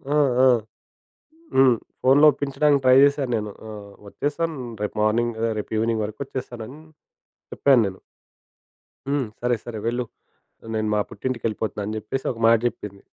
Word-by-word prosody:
ఆ! -, -, +4 dB, 0.3 s
ఆ! -, -, +7 dB, 1.1 s
హ్మ్. 130 Hz, -2 st, +5 dB, 0.3 s
ఫోనులో 140 Hz, +4 st, +6 dB
ఒప్పించడానికి 140 Hz, 0 st, +1 dB
ట్రై 130 Hz, 0 st, +6 dB
జేశాను 140 Hz, -3 st, +2 dB
నేను. 105 Hz, -1 st, -3 dB, 0.2 s
ఆహ్, 105 Hz, -2 st, -9 dB, 0.2 s
"ఒచ్చేసాను 150 Hz, +6 st, -3 dB, 0.2 s
రేపు 105 Hz, -, -3 dB
మార్నింగ్, 115 Hz, +2 st, +1 dB, 0.2 s
రేపు 105 Hz, -, -5 dB
ఈవెనింగ్ 115 Hz, 0 st, 0 dB
వరకు 105 Hz, +1 st, -7 dB
ఒచ్చేస్తాను" 125 Hz, -3 st, -6 dB
అని 140 Hz, -, -11 dB, 0.7 s
చెప్పాను 135 Hz, -4 st, +4 dB
నేను. 95 Hz, -1 st, -7 dB, 1.1 s
"హ్మ్. 140 Hz, -4 st, 0 dB
సరే, 120 Hz, 0 st, +1 dB
సరే 115 Hz, -2 st, -6 dB
వెళ్ళు. 120 Hz, +1 st, -1 dB, 0.7 s
నేను 110 Hz, 0 st, -1 dB
మా -, -, +2 dB
పుట్టింటికెళ్ళిపోతున్నాను" 110 Hz, -4 st, -3 dB
అని 110 Hz, -, -4 dB
జెప్పేసి 130 Hz, +5 st, -5 dB
ఒక 115 Hz, -, -9 dB
మాట 115 Hz, 0 st, +6 dB
జెప్పింది. 100 Hz, -4 st, -4 dB
120 Hz, 140 wpm, -23 LUFS, 110-135 Hz, 1.1 s, ఆ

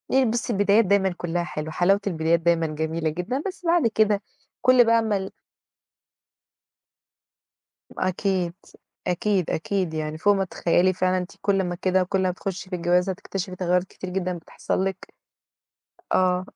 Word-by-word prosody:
آآ، 265 Hz, 0 st, +4 dB
بُصي 235 Hz, +1 st, -1 dB
البدايات 205 Hz, +2 st, +4 dB
دايمًا 190 Hz, -1 st, +2 dB
كلّها 175 Hz, 0 st, -2 dB
حلوة. 155 Hz, -1 st, -5 dB
حلاوة 185 Hz, +5 st, +3 dB
البدايات 165 Hz, -2 st, +1 dB
دايمًا 165 Hz, -1 st, +2 dB
جميلة 160 Hz, +1 st, -2 dB
جدًا. 180 Hz, -, -3 dB
بس 370 Hz, -1 st, -8 dB
بعد 335 Hz, -5 st, +3 dB
كده، 215 Hz, -2 st, +2 dB, 0.4 s
كل 255 Hz, -1 st, +6 dB
بقى 230 Hz, 0 st, +4 dB
ما 215 Hz, -2 st, 0 dB
ال 190 Hz, 0 st, -5 dB, 2.7 s
أكيد، 185 Hz, -1 st, 0 dB, 0.5 s
أكيد، 185 Hz, 0 st, 0 dB
أكيد. 185 Hz, 0 st, -1 dB
يعني 155 Hz, 0 st, -3 dB
فوق 205 Hz, +5 st, +4 dB
ما 195 Hz, -, +1 dB
تتخيلي 180 Hz, +1 st, +2 dB
فعلًا، 185 Hz, +1 st, +1 dB
أنتِ 180 Hz, 0 st, -4 dB
كل 195 Hz, -1 st, +2 dB
ما 175 Hz, -1 st, -3 dB
كده، 185 Hz, +1 st, +1 dB
كل 190 Hz, +1 st, -1 dB
ما 185 Hz, -, +2 dB
تخشي 185 Hz, +1 st, -6 dB
في 185 Hz, -, -2 dB
الجواز 180 Hz, +2 st, +2 dB
هتكتشفي 190 Hz, 0 st, -4 dB
تغيرات 180 Hz, 0 st, +1 dB
كتيرة 185 Hz, 0 st, -9 dB
جدًا 180 Hz, -1 st, -2 dB
بتحصل 170 Hz, +2 st, -3 dB
لِك. 195 Hz, 0 st, -5 dB, 1.0 s
آه. 185 Hz, 0 st, +2 dB
185 Hz, 150 wpm, -24 LUFS, 175-200 Hz, 2.7 s, كل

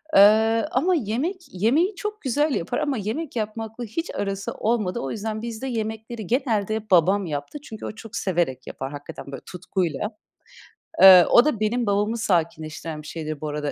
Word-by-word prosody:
Iıı, 220 Hz, +3 st, +6 dB
ama 350 Hz, +8 st, +2 dB
yemek 275 Hz, -, -1 dB, 0.2 s
yemeği 280 Hz, -, +2 dB
çok 420 Hz, +2 st, -5 dB
güzel 290 Hz, +2 st, +1 dB
yapar 165 Hz, -, -2 dB
ama 290 Hz, -3 st, -1 dB
yemek 230 Hz, +10 st, -4 dB
yapmakla 225 Hz, +1 st, -4 dB
hiç 240 Hz, +10 st, -4 dB
arası 195 Hz, -1 st, -3 dB
olmadı. 215 Hz, -5 st, -1 dB
O 135 Hz, -, -4 dB
yüzden 215 Hz, 0 st, -4 dB
bizde 235 Hz, +2 st, -5 dB
yemekleri 220 Hz, -2 st, -4 dB
genelde 220 Hz, -3 st, 0 dB
babam 190 Hz, +3 st, +4 dB
yaptı. 145 Hz, -, -5 dB
Çünkü 220 Hz, -5 st, -8 dB
o -, -, -4 dB
çok 220 Hz, 0 st, -11 dB
severek 170 Hz, -9 st, -1 dB
yapar 135 Hz, +1 st, -6 dB
hakikaten 145 Hz, 0 st, -8 dB
böyle 135 Hz, -, -7 dB
tutkuyla. 180 Hz, -1 st, -2 dB, 0.9 s
Eee, 185 Hz, -2 st, +10 dB
o 240 Hz, -, +7 dB
da 300 Hz, -8 st, 0 dB
benim 230 Hz, +3 st, 0 dB
babamı 205 Hz, +2 st, +1 dB
sakinleştiren 160 Hz, -5 st, -2 dB
bir 150 Hz, -, -12 dB
şeydir 155 Hz, -2 st, -5 dB
bu 155 Hz, -, -3 dB
arada, 150 Hz, -1 st, -3 dB
215 Hz, 165 wpm, -24 LUFS, 175-235 Hz, 0.9 s, Eee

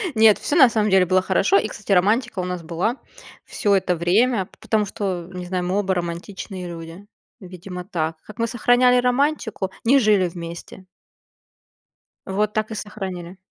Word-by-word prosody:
Нет, 220 Hz, -1 st, +6 dB
всё 295 Hz, -, -2 dB
на 270 Hz, -7 st, +7 dB
самом 215 Hz, -2 st, +1 dB
деле 190 Hz, -1 st, +4 dB
было 185 Hz, +1 st, +3 dB
хорошо. 190 Hz, +1 st, +2 dB
И, 215 Hz, -, +1 dB
кстати, 205 Hz, -1 st, -7 dB
романтика 210 Hz, +3 st, +2 dB
у -, -, -1 dB
нас 180 Hz, -1 st, -4 dB
была 175 Hz, +10 st, -2 dB, 0.5 s
всё 205 Hz, -, 0 dB
это 185 Hz, -2 st, +1 dB
время, 190 Hz, +5 st, +1 dB
потому 215 Hz, -2 st, 0 dB
что, 185 Hz, -4 st, -4 dB
не 180 Hz, -1 st, -6 dB
знаю, 180 Hz, 0 st, -2 dB
мы 185 Hz, +3 st, 0 dB
оба 195 Hz, -2 st, 0 dB
романтичные 180 Hz, +2 st, -5 dB
люди. 165 Hz, +3 st, -9 dB, 0.4 s
Видимо 180 Hz, 0 st, -8 dB
так. 160 Hz, -3 st, -3 dB
Как 215 Hz, -, -13 dB
мы 230 Hz, -, +1 dB
сохраняли 245 Hz, +2 st, +3 dB
романтику? 250 Hz, -6 st, 0 dB
Не 275 Hz, +4 st, +5 dB
жили 210 Hz, -6 st, +3 dB
вместе. 170 Hz, +2 st, -9 dB, 1.4 s
Вот 210 Hz, +2 st, -1 dB
так 215 Hz, -1 st, -2 dB
и -, -, -4 dB
сохраняли. 190 Hz, -4 st, -6 dB
195 Hz, 165 wpm, -22 LUFS, 180-220 Hz, 1.4 s, на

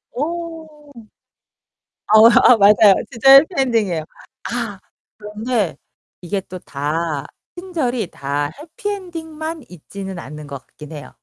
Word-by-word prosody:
어. 315 Hz, -1 st, -6 dB, 1.2 s
어 215 Hz, +1 st, +7 dB
아 240 Hz, 0 st, +6 dB
맞아요. 205 Hz, -1 st, +6 dB, 0.2 s
진짜 270 Hz, +3 st, +5 dB
해피 275 Hz, +3 st, +8 dB
엔딩이에요. 215 Hz, -11 st, 0 dB, 0.5 s
아. 230 Hz, -5 st, -4 dB, 0.4 s
그런데 210 Hz, -1 st, -2 dB, 0.5 s
이게 195 Hz, +3 st, -2 dB
또 185 Hz, 0 st, -10 dB
다 150 Hz, 0 st, -3 dB, 0.3 s
친절이 265 Hz, -, -3 dB
다 145 Hz, +1 st, -3 dB
해피 375 Hz, +8 st, -7 dB
엔딩만 325 Hz, -5 st, -6 dB
있지는 190 Hz, +2 st, -9 dB
않는 150 Hz, 0 st, -9 dB
것 140 Hz, -3 st, -9 dB
같긴 150 Hz, +1 st, -13 dB
해요. 150 Hz, -1 st, -10 dB
220 Hz, 225 characters per minute, -19 LUFS, -, 1.2 s, 해피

